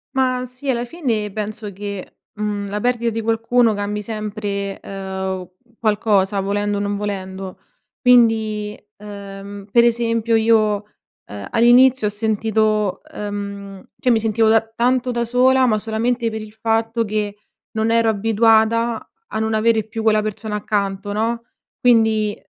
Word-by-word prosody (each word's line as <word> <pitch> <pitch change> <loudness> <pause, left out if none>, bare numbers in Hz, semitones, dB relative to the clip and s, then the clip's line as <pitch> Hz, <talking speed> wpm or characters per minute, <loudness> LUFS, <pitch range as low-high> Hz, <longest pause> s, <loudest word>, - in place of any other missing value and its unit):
Ma 255 -1 +1
sì, 255 +3 -8
alla 240 -2 +1
fine 235 - -2
penso 210 0 -5
che, 200 -1 -7 0.2
mhmm, 210 -1 -3
la 205 +1 -3
perdita 235 -1 +1
di 225 - -3
qualcuno 230 +1 +2
cambi 205 +1 -3
sempre, 205 -2 -4
uhm, 190 -1 -5 0.3
qualcosa, 205 -2 +2
volendo 205 +1 -1
o - - -1
non 205 0 -1
volendo. 190 -2 -5 0.4
Quindi, 220 -4 +3 0.2
uhm, 200 -1 -9
per 235 +2 +6
esempio 230 -1 +1
io, 220 -1 +4 0.5
uhm, 100 -1 -8
all'inizio 245 0 +5
ho - - +1
sentito 215 -1 0
uhm, 200 -1 -6 0.2
cioè 255 - 0
mi 230 -2 +4
sentivo 220 0 +2
da 225 - +6
tanto 245 +3 0
da 235 0 -1
sola, 255 +2 +4
ma 220 -3 +2
solamente 230 +2 -1
per 220 0 -5
il 215 - -10
fatto 225 +1 0
che 210 -1 -2 0.3
non 220 0 0
ero 230 0 +3
abituata 225 +1 +2 0.2
a - - -1
non 220 0 0
avere 220 0 +2
più 220 0 -5
quella 215 -1 +4
persona 215 0 -4
accanto, 205 -1 -2
no, 230 +2 -1 0.3
Quindi 220 -3 +3
220 Hz, 145 wpm, -20 LUFS, 205-230 Hz, 0.5 s, per